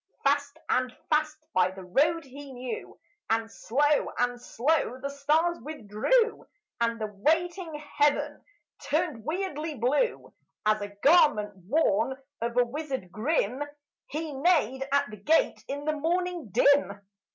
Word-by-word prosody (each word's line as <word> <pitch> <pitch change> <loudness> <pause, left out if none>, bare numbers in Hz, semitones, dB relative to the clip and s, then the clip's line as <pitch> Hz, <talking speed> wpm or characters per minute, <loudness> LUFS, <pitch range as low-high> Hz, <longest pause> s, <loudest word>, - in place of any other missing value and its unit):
Fast, 285 +1 +1
and 255 0 +1 0.2
fast, 305 0 +2 0.2
by 185 0 +4
the 190 0 -10
road 305 - +2
he 275 +1 -10
knew; 250 0 -6 0.3
And 225 0 0
slow, 290 +7 +1
and 245 0 0
slow, 260 +1 0
the 280 +2 -4
stars 310 +5 +1
withdrew; 305 - 0 0.4
And 230 0 0
the 215 - -1
waiting 335 - 0 0.3
heaven 290 0 +2 0.5
turned 305 -7 0
weirdly 315 - -3
blue, 280 - 0 0.3
As 215 0 +3
a 205 - -3 0.2
garment 280 -10 +5
worn 265 -2 +2 0.2
of 235 +1 -2
a 245 - +5
wizard 265 - -5
grim. 250 - 0 0.5
He 310 0 -4
neighed 270 -4 +2
at 280 0 +3
the 215 - -8
gate 310 +12 +2
in 285 +1 -4
the 310 - +1
morning 345 - -1
dim. 245 -2 +3
280 Hz, 135 wpm, -28 LUFS, 235-310 Hz, 0.5 s, garment